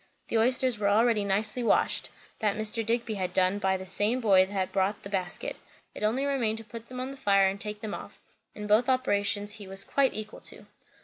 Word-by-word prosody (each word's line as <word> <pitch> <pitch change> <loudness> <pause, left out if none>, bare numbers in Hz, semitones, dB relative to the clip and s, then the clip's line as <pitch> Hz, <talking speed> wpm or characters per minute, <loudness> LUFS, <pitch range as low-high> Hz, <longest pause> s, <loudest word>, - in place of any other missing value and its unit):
The 230 - +1
oysters 250 0 +2
were 200 -1 +2
already 220 0 +3
nicely 210 +5 +1
washed; 235 - +2 0.3
that 210 -2 0
Mr. 220 +1 0
Digby 230 0 -1
had 200 - -4
had 180 - -2
done 185 +2 +2
by 190 -1 +1
the 185 - -8
same 205 +6 +1
boy 195 -5 +5
that 190 -1 -2
brought 195 +1 0
the 200 - -7
basket; 185 -3 -3 0.4
it - - -9
only 230 +6 +1
remained 240 -6 0
to 225 - -8
put 230 +1 -10
them 255 0 -7
on 260 +1 -4
the 275 - -10
fire 195 -4 +3
and 195 +1 -3
take 210 0 -6
them 215 - -5
off; - - -9 0.4
and 210 0 -6
both 220 +5 +3
operations 205 -5 0
he 205 -2 -8
was 195 +1 0
quite 275 -1 +1
equal 215 0 -7
to. - - -6
210 Hz, 225 wpm, -28 LUFS, 200-235 Hz, 0.4 s, boy